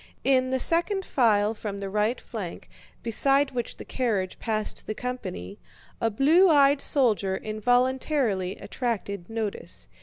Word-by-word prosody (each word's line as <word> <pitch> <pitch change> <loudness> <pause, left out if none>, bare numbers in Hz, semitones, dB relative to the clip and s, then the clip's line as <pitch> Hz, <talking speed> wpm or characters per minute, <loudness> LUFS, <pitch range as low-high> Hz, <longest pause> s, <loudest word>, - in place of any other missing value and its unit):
In 255 -1 +3
the 260 - +1
second 370 - +1
file 215 -4 +2
from 210 -2 -6
the 200 0 -5
right 210 +5 0
flank, 205 -8 -7 0.4
beside 275 +4 +2
which 240 -2 -4
the - - -9
carriage 210 -8 -2
passed 215 -2 -2
the 215 - -3
company, 185 - -6 0.4
a 230 - +2
blue 310 - +5
eyed 285 -2 +5
soldier 210 -8 +2
involuntarily 245 -2 0
attracted 200 -6 -4
notice. 225 -2 -4
230 Hz, 130 wpm, -26 LUFS, 205-265 Hz, 0.4 s, blue